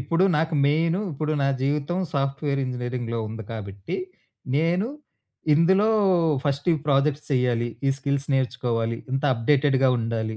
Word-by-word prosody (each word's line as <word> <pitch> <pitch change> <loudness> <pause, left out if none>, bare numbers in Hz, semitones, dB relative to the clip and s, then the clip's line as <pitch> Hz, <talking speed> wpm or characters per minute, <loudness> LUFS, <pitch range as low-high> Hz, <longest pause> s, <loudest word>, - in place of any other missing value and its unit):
ఇప్పుడు 165 +7 +1
నాకు 160 +1 0
మెయిను 165 +5 +2
ఇప్పుడు 155 +2 -2
నా - - +2 0.2
జీవితం 145 +5 0 0.2
సాఫ్ట్‌వేర్ 140 0 -1
ఇంజినీరింగ్‌లో 125 -2 -3
ఉంది 110 +1 -6
కాబట్టి, 100 -3 -6 0.6
నేను 170 +6 +1 0.7
ఇందులో 190 +7 +4 0.6
ఫస్ట్ 140 -1 -1
ఈ - - +3
ప్రాజెక్ట్స్ 145 +1 +2
చెయ్యాలి 125 -3 +1 0.2
ఈ - - +4
స్కిల్స్ 140 0 -2
నేర్చుకోవాలి. 115 -3 -1 0.2
ఇంత 135 +2 -1
అప్డేటెడ్‌గా 135 +2 +2
ఉండాలి. 110 -1 -2
135 Hz, 125 wpm, -24 LUFS, 120-150 Hz, 0.7 s, ఇందులో